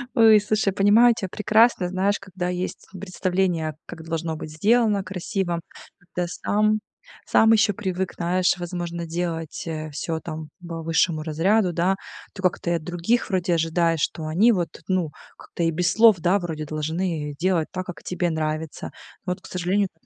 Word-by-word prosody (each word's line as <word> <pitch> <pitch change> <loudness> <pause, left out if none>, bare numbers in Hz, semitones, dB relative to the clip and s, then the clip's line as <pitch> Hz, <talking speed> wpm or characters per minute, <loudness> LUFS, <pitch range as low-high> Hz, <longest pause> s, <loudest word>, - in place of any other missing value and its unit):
Ой, 220 -2 +7
слушай, 210 -1 0
понимаю 215 +5 +5
тя 190 - -3
прекрасно. 215 -1 +3
Знаешь, 195 +2 0
когда 185 -2 -5
есть, 180 +1 -4
м, 190 - -8
представление, 180 -4 -1
как 165 -2 -9
должно 165 0 -3
быть 155 0 -7
сделано 210 +4 +2
красиво. 185 -1 -2 0.4
Когда 175 0 -4
сам 215 +4 +1 0.5
сам 225 - +4
ещё 215 -1 +4
привык, 190 -3 -3
знаешь, 180 +1 +1
возможно, 175 -1 -4
делать, 165 -1 -4
э, 155 -1 -4
всё 160 +3 -3
там 155 -1 -6 0.2
по 165 -1 -5
высшему 165 0 +1
разряду, 175 +5 +1
да. 180 +4 +2 0.4
То 190 - -8
как-то 180 -1 0
и - - +2
от 165 - -3
других 175 +7 0
вроде 180 -3 +1
ожидаешь, 165 0 +1
что 160 +1 -2
они 205 +10 +4
вот, 175 -4 -1 0.2
ну, 185 -4 0 0.3
как-то 170 - -5
и 165 - +2
без 170 +2 +1
слов, 225 -1 +6
да, 180 +4 +2
вроде 160 -4 -4
должны, 155 +1 -2
э, - - -9
делать 175 -2 +1
так, 185 0 -3
как 175 -4 -8
тебе 180 -1 -1
нравится. 155 -1 -3 0.3
Но 180 - 0
вот, 185 - -13
к - - -12
сожалению, 185 +2 0
это 160 - -38
180 Hz, 175 wpm, -24 LUFS, 165-195 Hz, 0.5 s, Ой